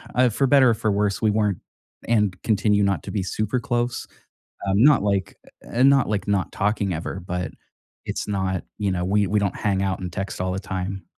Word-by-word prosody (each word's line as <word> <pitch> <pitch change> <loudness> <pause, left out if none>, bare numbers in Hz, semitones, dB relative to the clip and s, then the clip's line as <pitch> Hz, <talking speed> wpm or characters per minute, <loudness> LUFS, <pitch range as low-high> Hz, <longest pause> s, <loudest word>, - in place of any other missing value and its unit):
uh, 125 0 +4
for 135 +5 +1
better 135 -2 +6
or - - +3
for 110 0 -1
worse, 100 0 0
we 110 - +3
weren't, 105 -3 0 0.5
and 105 -5 +1
continue 105 -2 +2
not 95 -5 0
to - - -6
be 100 - -1
super 110 +6 -1
close. 120 -2 -2 0.6
Um, 100 +3 +3
not 145 -6 +6
like 100 -3 -1 0.3
e - - -13
eh, 120 - +1
not 135 -4 +5
like 105 -1 -2
not 100 -2 0
talking 105 -2 0
ever, 80 +4 -4
but 90 0 -4 0.6
it's - - -4
not, 95 -2 -1 0.2
you 100 -2 0
know 90 -1 -1
we 100 +2 +2
we 105 +3 +2
don't 100 -2 -1
hang 100 -2 0
out 95 -1 -1
and 90 -2 -5
text 95 +1 -4
all 90 0 -1
the 95 - -3
time. 95 0 -4
100 Hz, 215 wpm, -23 LUFS, 95-110 Hz, 0.6 s, better